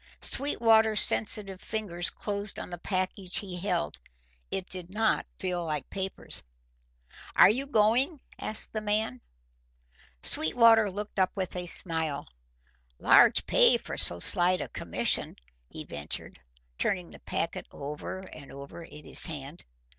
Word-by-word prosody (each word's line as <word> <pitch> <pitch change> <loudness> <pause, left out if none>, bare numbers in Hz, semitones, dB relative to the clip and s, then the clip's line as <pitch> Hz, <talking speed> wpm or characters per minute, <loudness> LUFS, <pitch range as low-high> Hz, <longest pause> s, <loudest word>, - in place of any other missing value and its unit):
Sweetwater's 225 -5 +3
sensitive 200 -3 +1
fingers 185 -5 -1
closed 205 0 -3
on - - -7
the 175 - -6
package 185 0 -1
he 190 -4 -3
held. 175 - -2 0.5
It 190 -1 -3
did 180 -1 -5
not 220 +2 +1
feel 180 -2 -2
like 150 -3 -4
papers. 190 -1 -5 0.9
"Are - - +8
you 265 +5 -2
going?" 250 +6 +2 0.2
asked 215 - -2
the 215 - -2
man. 210 - -1 1.0
Sweetwater 225 +5 +4
looked 205 +1 -6
up 185 - +3
with 185 -2 -4
a 180 0 -4
smile. 160 -5 0 0.7
"Large - - +5
pay - - +5
for - - -7
so 85 - +3
slight 180 - +4
a - - -5
commission," - - -1 0.3
he - - -7
ventured, 75 0 -6 0.4
turning 180 -3 -1
the - - -12
packet 165 - -3
over 150 +6 -7
and 140 -3 -11
over 140 +4 -10
in 150 -2 -12
his - - +6
hand. 150 0 -8
185 Hz, 135 wpm, -28 LUFS, 165-215 Hz, 1.0 s, Are